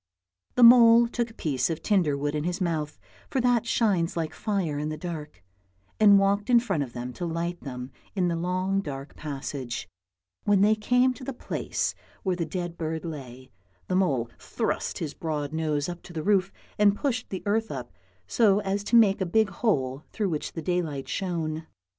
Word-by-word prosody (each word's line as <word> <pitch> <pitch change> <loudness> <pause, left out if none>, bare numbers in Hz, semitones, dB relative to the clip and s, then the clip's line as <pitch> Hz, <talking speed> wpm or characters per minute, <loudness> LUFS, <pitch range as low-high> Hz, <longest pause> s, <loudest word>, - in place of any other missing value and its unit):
The 250 - +4
mole 235 0 +8
took 235 0 -2
a - - -14
piece 135 - 0
of 165 -1 -4
tinder 175 -9 +2
wood 145 +1 -2
in 150 -1 -1
his 175 +3 -2
mouth, 160 -5 -2 0.3
for 270 - 0
that 240 -2 +2
shines 190 -8 +1
like 160 -1 -2
fire 185 -9 -1
in 150 +1 -2
the 155 - -4
dark, 155 - -7 0.6
and 205 -2 +8
walked 200 +2 +2
in 240 -1 +7
front 195 -10 -1
of 125 -4 -4
them 125 +1 -5
to 175 - -4
light 170 +1 -3
them 125 -1 -7 0.2
in 185 -3 +2
the 170 - 0
long 185 +3 0
dark 140 -4 -7
passage; 135 -6 -5 0.6
when 205 -2 +3
they 210 +2 +5
came 250 +4 +2
to 255 - -12
the 275 - -4
place - - -2 0.3
where 185 -2 +1
^the 170 -3 -3
dead 175 -1 -4
bird 160 0 -3
lay, 130 -5 -8 0.4
the^ 185 - 0
mole 140 -11 +2
thrust - - -2
his 155 -4 -4
broad 150 -2 -3
nose 155 -2 0
up 175 -1 -6
to 175 - -12
the 160 -2 -4
roof 195 0 +2 0.3
and 205 -1 +5
pushed 250 -1 -2
the 190 - -5
earth 220 +2 +1
up 125 -4 -6 0.3
so 200 - +3
as 200 0 -1
to 235 - +1
make 205 -4 +5
a - - +2
big 220 +4 +3
hole 140 - 0
through 205 -3 -1
which 155 -3 -3
the 165 - -5
daylight 160 -6 -2
shone. 160 -4 -3
175 Hz, 195 wpm, -27 LUFS, 150-205 Hz, 0.6 s, mole